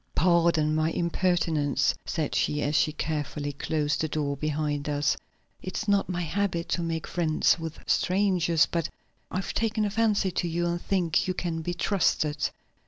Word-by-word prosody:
"Pardon 170 -3 +3
my 155 +1 +2
impertinence," 170 -4 +1
said 155 -3 -2
she, 150 0 +1
as 145 - 0
she 155 0 +3
carefully 150 -1 -3
closed 150 +1 -1
the 160 - 0
door 145 -2 -1
behind 150 0 -2
us. 145 0 +1 0.5
"It's 190 +4 -4
not 200 -1 +2
my 175 -1 -1
habit 175 0 -1
to 175 - 0
make 165 -1 -2
friends 165 -1 +2
with 160 -1 -5
strangers, 180 -4 +2
but 170 -2 -2 0.4
I've 185 +1 -3
taken 220 -1 0
a 205 - -1
fancy 215 -3 +2
to 175 - -1
you 170 +1 -1
and 175 0 -1
think 180 -5 +1
you 185 - -1
can 165 -2 -2
be 175 +2 -3
trusted. 155 -6 +1
165 Hz, 165 wpm, -27 LUFS, 150-180 Hz, 0.5 s, Pardon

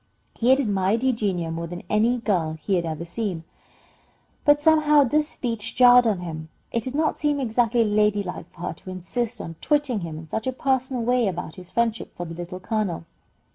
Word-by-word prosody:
He 240 - 0
had 265 +1 +6
admired 205 -1 +1
Eugenia 200 -10 0
more 165 +1 -4
than 175 +1 -7
any 225 +5 +2
girl 180 -9 0
he 195 - -2
had 175 -2 +1
ever 160 +1 -4
seen, 175 -2 -4 1.0
but 290 -1 +6
somehow 300 -1 +5
this 300 +4 +2
speech 230 -7 -3
jarred 245 -1 +7
on 200 -5 0
him. 160 -2 -6 0.2
It 230 - 0
did 255 +4 -4
not 310 +1 +1
seem 295 -1 +1
exactly 235 -1 +2
ladylike 205 -4 0
for 170 - -15
her 175 - -3
to 180 - -12
insist 215 +6 -4
on 165 -1 -7
twitting 290 -6 +1
him 165 -4 -6
in 160 0 -9
such 220 +9 -3
a 260 - 0
personal 260 -1 0
way 245 -1 +2
about 175 -4 -4
his 180 -1 -11
friendship 230 +1 -1
for 175 - -4
the 165 - -7
Little 175 +2 -7
Colonel. 190 -5 -2
215 Hz, 195 wpm, -24 LUFS, 175-250 Hz, 1.0 s, jarred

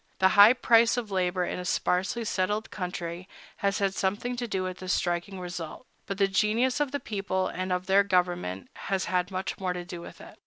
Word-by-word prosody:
The 190 - +5
high 205 +3 +8
price 235 -1 +4
of 225 -4 -3
labor 180 -1 0
in - - -4
a - - -4
sparsely 190 +6 0
settled 210 +2 -1
country 180 -1 -5 0.3
has 200 -1 0
had 195 -1 +1
something 205 +6 -1
to 240 0 -3
do 190 -3 -1
with 185 -1 -5
this 185 0 -1
striking 175 +2 -1
result; 175 +4 -6 0.2
but 195 - -3
the 195 -1 +3
genius 220 +7 +1
of 290 -3 0
the 285 - -2
people 195 -4 -2
and 185 0 -4
of 180 0 -1
their 195 +1 +5
government 180 - 0 0.2
has 190 -1 0
had 180 -1 0
much 185 0 -4
more 185 -2 -1
to 175 -1 -6
do 175 -1 -7
with - - -11
it. - - -13
190 Hz, 210 wpm, -28 LUFS, 180-205 Hz, 0.3 s, high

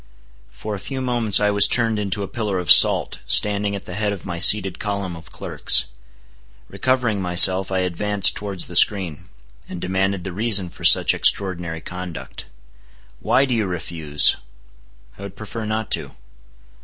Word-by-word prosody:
For 110 - -8
a 100 - -6
few 135 +7 -7
moments 120 -5 +3
I 105 0 +1
was 100 0 +4
turned 115 -3 -1
into 100 0 -3
a - - -6
pillar 105 -4 -4
of 90 -1 0
salt, - - +4
standing 100 0 +3
at 100 - -9
the 90 - -9
head 105 +1 -2
of 100 -3 -8
my 85 -1 -6
seated 95 0 +4
column 100 -4 -5
of 80 0 -14
clerks. - - 0 0.8
Recovering 125 -6 -2
myself, 95 +1 +4
I 95 -1 -1
advanced 100 +3 0
towards 100 -3 -4
the 85 - -11
screen, 90 -4 +1 0.4
and 90 - -8
demanded 95 +1 -2
the 95 - -7
reason 100 -3 +2
for - - -15
such - - +5
extraordinary 85 -4 0
conduct. 90 -1 -9 0.7
"Why 135 - +1
do 130 - -3
you 110 -4 -1
refuse?" 80 -4 -1 0.8
"I - - -11
would 100 -2 -9
prefer 110 +1 -8
not 110 0 -4
to." - - -3
100 Hz, 165 wpm, -20 LUFS, 90-105 Hz, 0.8 s, such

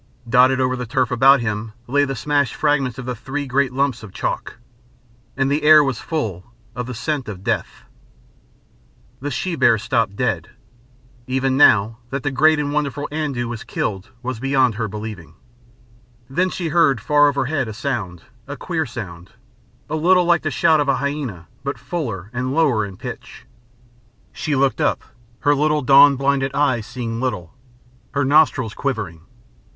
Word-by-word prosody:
Dotted 130 +2 +4
over 130 0 +1
the 125 -1 -5
turf 130 0 0
about 135 +2 +5
him 110 -1 -3
lay 145 +4 +2
the 135 -1 -4
smashed 145 +2 0
fragments 140 -4 0
of 130 - -7
the 125 - -3
three 140 +6 -5
great 135 0 +1
lumps 135 -2 0
of 105 -3 -10
chalk. - - -4 0.8
And 135 0 +1
the 145 +2 +1
air 155 0 +7
was 135 -5 -2
full 110 - -3 0.3
of 125 0 -4
the 125 - -6
scent 135 +1 -3
of 95 -3 -8
death. - - -3 1.4
The 145 - -4
she 170 +6 -2
bear 130 -5 +4
stopped 115 -2 -1
dead. - - -1 0.8
Even 130 +1 0
now, 110 -4 +4
that 135 +1 -4
the 145 - -1
great 155 +4 +4
and 145 -1 -2
wonderful 145 -1 -2
Andoo 145 -6 -2
was 115 -2 -6
killed 95 +2 -4
was 125 -2 -4
beyond 130 -2 +2
her 110 +1 -3
believing. 105 -7 -8 0.9
Then 180 +8 0
she 175 -2 -4
heard 155 -6 +3
far 145 +6 +4
overhead 140 -1 -1
a - - -5
sound, 105 - -4 0.2
a 145 - -6
queer 160 -5 -2
sound, 95 -8 -8 0.5
a 155 - -3
little 180 +3 +3
like 170 -1 +3
the 155 - -2
shout 155 +1 +3
of 145 -1 0
a 135 - +3
hyæna 135 - -4 0.2
but 140 +1 -3
fuller 110 - -5
and 130 +2 -2
lower 140 -10 +2
in 95 -2 -11
pitch. - - -9 0.9
She 150 -2 -2
looked 135 -3 +1
up, - - +1 0.4
her 145 - +4
little 150 0 +1
dawn 140 +2 +7
blinded 135 0 0
eyes 130 -7 +1
seeing 115 -2 -5
little, 115 -10 -3 0.6
her 140 -1 +1
nostrils 130 -5 +3
quivering. 105 - -3
130 Hz, 165 wpm, -20 LUFS, 115-145 Hz, 1.4 s, air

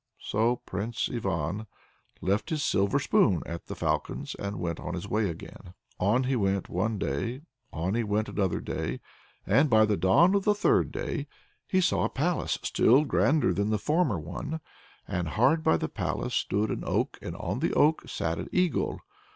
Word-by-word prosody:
So 115 +4 +1
Prince 115 +2 -3
Ivan 95 -2 -2 0.5
left 100 +4 0
his 155 -3 -1
silver 100 +7 +2
spoon 130 - +3
at 85 0 -7
the - - -5
Falcon's, - - -2
and 100 0 -5
went 85 -1 -3
on - - -4
his 90 - -5
way 105 -2 +1
again. 90 +2 -10 0.2
On 110 +8 +2
he 130 +1 0
went 100 -4 0
one 105 +5 -1
day, 105 - -2 0.3
on 85 +5 -2
he 115 +1 +1
went 105 0 0
another 95 -4 -1
day, - - -3 0.5
and 135 +9 +4
by 110 -2 +6
the 105 -1 +1
dawn 165 - +5
of 200 -1 +2
the 210 +1 +3
third 205 - +2
day - - -3 0.4
he 185 - +2
saw 175 - +2
a - - 0
palace 165 +5 0
still 135 +6 +4
grander 150 +1 +2
than 100 +1 0
the 110 - +2
former 150 - +1
one, 90 - -5 0.5
and 90 -1 -2
hard 125 - +3
by 80 - +4
the - - -2
palace - - -3
stood 105 +2 0
an - - -3
oak, - - -1
and - - -6
on - - -3
the - - 0
oak 155 +2 +3
sat 80 0 -2
an - - -5
eagle. 180 -2 0
110 Hz, 185 wpm, -28 LUFS, 95-140 Hz, 0.5 s, by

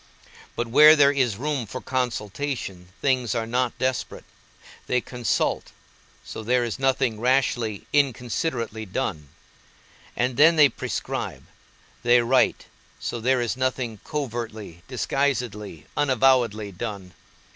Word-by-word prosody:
But 120 - -1
where 150 +7 +8
there 140 -2 +5
is 125 -7 0
room 140 -2 -2
for 130 - -6
consultation 120 -6 -3
things 130 -4 +1
are 115 -1 -1
not 125 +3 -1
desperate. 130 -2 -2 0.6
They 125 - +2
consult, 120 -1 -1 0.5
so - - -7
there 125 +3 +1
is 120 0 -4
nothing 130 -4 +1
rashly, 120 -4 0
inconsiderately 125 - -1
done; 90 - -3 0.9
and 125 0 -1
then 165 +3 +7
they 150 -3 +7
prescribe, - - -4 0.6
they 120 0 +5
write, 130 +2 +2 0.3
so 120 - -4
there 130 +1 +2
is 120 0 -1
nothing 130 -4 -2
covertly, 115 - -5
disguisedly, 125 - -2
unavowedly 130 -7 +2
done. 100 -2 -6
125 Hz, 115 wpm, -24 LUFS, 110-135 Hz, 0.9 s, where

